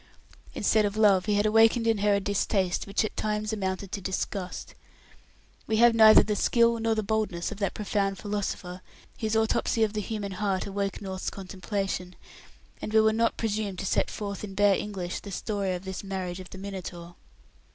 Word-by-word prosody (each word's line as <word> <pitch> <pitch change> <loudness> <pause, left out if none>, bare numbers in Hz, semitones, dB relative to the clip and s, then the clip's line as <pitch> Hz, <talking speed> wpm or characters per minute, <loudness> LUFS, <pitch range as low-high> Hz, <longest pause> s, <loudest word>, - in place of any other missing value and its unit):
Instead 215 -1 +3
of 205 +1 -1
love, 200 -3 +4
he 210 - +2
had 205 +1 +2
awakened 225 +2 +4
in 225 -2 +2
her 205 0 +3
a - - +2
distaste 195 -2 0
which 200 +2 +1
at - - -6
times 215 0 -2
amounted 190 -2 -3
to 200 - -4
disgust. 190 0 -4 0.9
We 220 - +1
have 235 +1 +6
neither 220 -1 +8
the 210 - -1
skill 235 +2 +3
nor 225 0 +1
the 215 - -1
boldness 210 -5 -1
of 210 - -7
that 200 -3 -1
profound 200 -2 -1
philosopher 195 -3 -4 0.4
whose 220 0 -1
autopsy 220 0 +1
of 215 -1 0
the 210 - -1
human 205 -1 -4
heart 190 0 -1
awoke 200 0 -3
North's 190 -1 -4
contemplation, 190 -1 -4 0.7
and - - -4
we 220 - +5
will 220 0 +3
not 230 +1 +1
presume 215 -3 -2
to - - -4
set - - +1
forth 200 -1 -5
in 195 -2 -7
bare 205 0 +5
English 190 -3 -3
the 205 - -10
story 195 -1 -2
of 180 +2 -8
this 190 +1 -5
marriage 190 -2 -4
of 185 - -10
the - - -10
Minotaur. 180 -3 -7
205 Hz, 190 wpm, -27 LUFS, 190-215 Hz, 0.9 s, neither